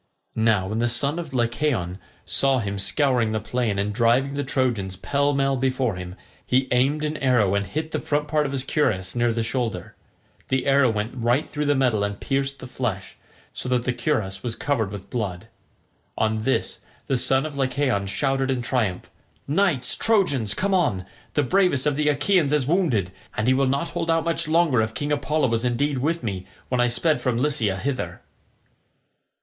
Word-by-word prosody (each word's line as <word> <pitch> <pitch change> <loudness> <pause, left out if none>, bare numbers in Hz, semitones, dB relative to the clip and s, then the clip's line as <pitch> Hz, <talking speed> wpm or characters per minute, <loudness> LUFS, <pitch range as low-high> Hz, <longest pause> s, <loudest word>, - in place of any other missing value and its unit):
Now 110 -4 +2
when 110 +2 -2
the 120 +1 +2
son 140 +7 +1
of 165 -4 -6
Lycaon 120 -7 -1 0.3
saw 135 -1 +2
him 100 -4 -3
scouring 115 +2 +1
the 110 - 0
plain 110 -1 -1
and 100 +1 -1
driving 120 +5 +2
the 145 0 -2
Trojans 120 -8 -1
pell 140 +9 0
mell 135 -1 +1
before 130 -2 0
him, 90 0 -7 0.3
he 130 +1 +1
aimed 140 +5 +2
an 155 0 -2
arrow 120 -7 +2
and 100 0 +1
hit 155 - -4
the - - -1
front 150 0 -1
part 150 -1 +1
of - - -5
his 135 -2 -2
cuirass 105 -11 0
near 120 -1 +1
the 115 0 -1
shoulder: 115 -6 -3 0.5
the 130 -1 0
arrow 135 -2 +4
went 110 +1 -2
right 120 +4 +1
through 150 0 -3
the 145 - +3
metal 125 -6 +2
and 100 0 -3
pierced 135 0 -1
the - - -9
flesh, 110 -7 -4 0.4
so 125 - -5
that 125 -1 +1
the 130 - 0
cuirass 115 -7 -1
was 115 -2 -3
covered 120 -8 -1
with 100 -1 -9
blood. 110 -3 -4 0.7
On 110 0 +1
this 130 +4 -1 0.3
the 135 - 0
son 130 +2 +2
of 155 -2 -6
Lycaon 130 -6 0
shouted 135 +5 0
in 130 -2 -1
triumph, 115 -8 -1 0.4
"Knights 155 -3 +2
Trojans, 145 - +1
come 195 +1 0
on; 130 - +1 0.3
the 145 - +3
bravest 180 -3 +2
of 150 -2 +2
the 150 +1 +2
Achaeans 150 +1 +2
is 150 -3 +2
wounded, 135 - +1 0.3
and 110 - 0
he 130 - +5
will 135 +1 +2
not 140 +6 0
hold 165 - -3
out 165 0 +2
much 165 -2 0
longer 155 -7 +3
if 110 0 -2
King 145 0 -2
Apollo 150 -1 +1
was 115 0 0
indeed 130 +3 0
with 165 +4 -1
me 95 -5 -4 0.2
when 125 -1 +1
I 120 - +4
sped 155 +6 +1
from 125 -3 0
Lycia 120 -8 +1
hither." 130 +6 -3
130 Hz, 190 wpm, -24 LUFS, 110-145 Hz, 0.7 s, he